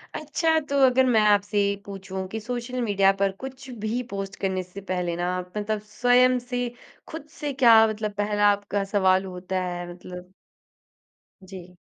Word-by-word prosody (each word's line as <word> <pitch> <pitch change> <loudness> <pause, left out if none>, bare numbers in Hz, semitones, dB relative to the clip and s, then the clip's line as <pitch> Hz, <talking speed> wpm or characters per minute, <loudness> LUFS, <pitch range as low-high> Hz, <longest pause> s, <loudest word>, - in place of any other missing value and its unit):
अच्छा 320 +1 +1
तो 280 0 +1
अगर 260 +1 +4
मैं 225 -4 +4
आपसे 205 0 +2
ये 200 - -1
पूछूँ 190 -1 -6
कि 220 +3 -5
सोशल 245 +2 -4
मीडिया 200 -3 +3
पर 195 -1 +3
कुछ 265 0 -9 0.2
भी 235 +3 -1
पोस्ट 195 0 -5
करने 190 -1 -1
से 185 +2 -11
पहले 175 -2 -2
ना 175 +1 -1
आप 180 0 -7
मतलब 210 0 -1 0.2
स्वयँ 250 +1 +4
से, 245 0 -3 0.4
खुद 315 -2 -8
से 290 -2 -3
क्या 230 -4 +7
मतलब 215 -1 -3
पहला 205 0 +2
आपका 200 0 -2
सवाल 190 -1 +3
होता 185 0 -4
है 175 -1 -5
मतलब? 180 +1 -11 1.1
जी। 185 -1 -11
205 Hz, 165 wpm, -25 LUFS, 185-245 Hz, 1.1 s, क्या